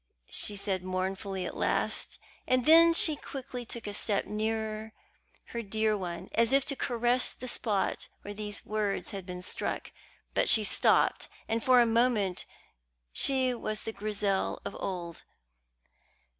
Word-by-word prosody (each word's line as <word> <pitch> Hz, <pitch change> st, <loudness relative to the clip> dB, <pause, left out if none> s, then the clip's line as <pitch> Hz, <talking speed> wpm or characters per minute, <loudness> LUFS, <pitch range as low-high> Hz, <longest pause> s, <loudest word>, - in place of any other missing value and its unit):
she 210 Hz, -, 0 dB
said 195 Hz, -2 st, -2 dB
mournfully 190 Hz, +1 st, -2 dB
at -, -, -5 dB
last; -, -, -1 dB, 0.3 s
and 255 Hz, -1 st, +2 dB
then 330 Hz, +2 st, +8 dB
she 325 Hz, -2 st, +4 dB
quickly 255 Hz, -3 st, -7 dB
took 235 Hz, -1 st, -6 dB
a 205 Hz, -, -4 dB
step 205 Hz, 0 st, 0 dB
nearer 220 Hz, +1 st, -3 dB, 0.6 s
her 235 Hz, -, -3 dB
dear 220 Hz, 0 st, 0 dB
one, 180 Hz, -2 st, -5 dB
as 230 Hz, +1 st, +3 dB
if 275 Hz, -1 st, +4 dB
to 275 Hz, -, -1 dB
caress 245 Hz, -1 st, +1 dB
the 255 Hz, -, -8 dB
spot 210 Hz, -5 st, -1 dB, 0.2 s
where 205 Hz, -, -6 dB
these 205 Hz, -1 st, -1 dB
words 210 Hz, -2 st, -2 dB
had 195 Hz, -2 st, -7 dB, 0.2 s
struck -, -, -3 dB
him. -, -, -30 dB, 0.4 s
But -, -, +2 dB
she 220 Hz, -, +6 dB
stopped, -, -, +3 dB, 0.2 s
and 225 Hz, 0 st, -1 dB
for 255 Hz, -1 st, +6 dB
a 240 Hz, -, +6 dB
moment 225 Hz, -5 st, +1 dB, 0.7 s
she 260 Hz, -, +3 dB
was 215 Hz, -3 st, -4 dB
the 225 Hz, -, -4 dB
Grizel 200 Hz, -1 st, -1 dB
of -, -, -5 dB
old. 175 Hz, -3 st, -4 dB
215 Hz, 150 wpm, -30 LUFS, 200-240 Hz, 0.7 s, then